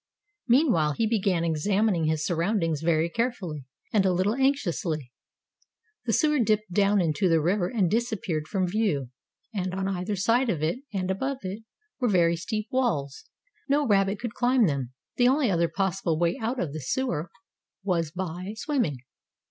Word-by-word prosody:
Meanwhile, 235 - +3
he 225 - 0
began 195 -6 +1
examining 175 +3 +1
his 155 0 0
surroundings 170 -3 0
very 160 0 +2
carefully, 180 - -3 0.3
and 210 -3 +4
a 190 - +3
little 185 +4 +1
anxiously. 175 - 0 1.0
The 225 - +2
sewer 300 +2 +3
dipped 215 -3 +1
down 200 +1 +3
into 175 +3 +1
the 165 -1 +4
river 175 +4 +1
and 210 -6 +1
disappeared 195 -7 -1
from 190 +2 0
view, 175 - -1 0.4
and 185 -3 -2
on 190 0 -1
either 195 +2 -2
side 230 +6 +2
of 160 -7 -1
it, 165 +10 0
and 190 -2 -1
above 265 +7 -2
it, 190 +4 -5 0.4
were 250 -3 +1
very 170 -3 +3
steep 215 +5 -3
walls. 155 - -1 0.4
No 290 +1 +3
rabbit 195 -3 +2
could 235 -2 -4
climb 245 -1 +3
them. 140 -7 -1 0.3
The 245 - +5
only 265 -3 +3
other 170 -1 +2
possible 190 -4 -1
way 170 +1 +1
out 240 +3 -2
of 150 -9 -2
the 155 - -5
sewer 180 - -2 0.5
was 170 -5 0
by 185 +3 -5
swimming. 240 - -1
190 Hz, 165 wpm, -26 LUFS, 165-225 Hz, 1.0 s, The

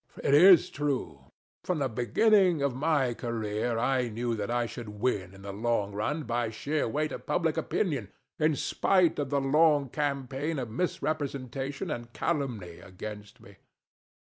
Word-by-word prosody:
THE - - -11
DEVIL. - - +7
It 150 - +7
is 185 -4 +7
true. 145 -3 -3 0.4
From 180 - -1
the 140 -3 0
beginning 165 - +3
of 140 -2 +1
my 140 -2 +1
career 115 0 -2
I 125 +1 +1
knew 115 +2 -2
that 105 -2 -3
I 120 0 +1
should 115 -1 -7
win 100 -6 -1
in 95 - -14
the 100 -1 -6
long 105 -1 0
run 110 +10 -2
by 120 -2 -1
sheer 145 +7 -2
weight 150 +6 -1
of - - -8
public - - +1
opinion, - - -1 0.3
in 155 0 +3
spite 180 +3 +2
of 145 -2 -2
the 140 0 +1
long 145 0 +3
campaign 140 +2 -2
of 125 -4 -4
misrepresentation 140 -3 -3
and 120 0 -5
calumny 120 - -3
against 105 +2 -9
me. - - -16
130 Hz, 165 wpm, -29 LUFS, 115-150 Hz, 0.4 s, DEVIL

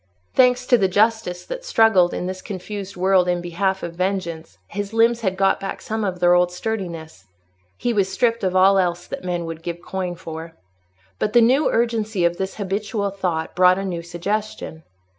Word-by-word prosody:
Thanks 250 -1 +4
to 245 -2 +4
the 195 - +3
justice 205 -2 +1
that - - -6
struggled 220 - +4
in - - -3
this 185 0 -5
confused 200 0 -6
world 185 0 +3
in 175 0 +1
behalf 190 +3 -1
of 170 - -4
vengeance, 175 -3 -3
his 205 +1 -5
limbs 230 +1 +3
had 190 -3 -1
got 195 0 +2
back 195 - -5
some 220 0 -3
of 185 -3 -2
their 175 0 +5
old 180 0 +3
sturdiness. 175 - -5 0.5
He 240 - -1
was 200 -3 +1
stripped 230 +3 +1
of 185 -1 0
all 190 +1 +5
else 175 -1 0
that - - -7
men 175 -2 -2
would 165 0 -6
give 170 0 -5
coin 180 -1 -4
for. 165 -1 -8 0.6
But 210 - -1
the 240 - +6
new 260 +6 +4
urgency 220 -5 0
of 170 0 +1
this 190 0 -3
habitual 200 +1 -2
thought 180 -5 -3
brought 180 0 +5
a 195 - -3
new 175 -3 -3
suggestion. 175 0 -4
190 Hz, 190 wpm, -22 LUFS, 175-215 Hz, 0.6 s, the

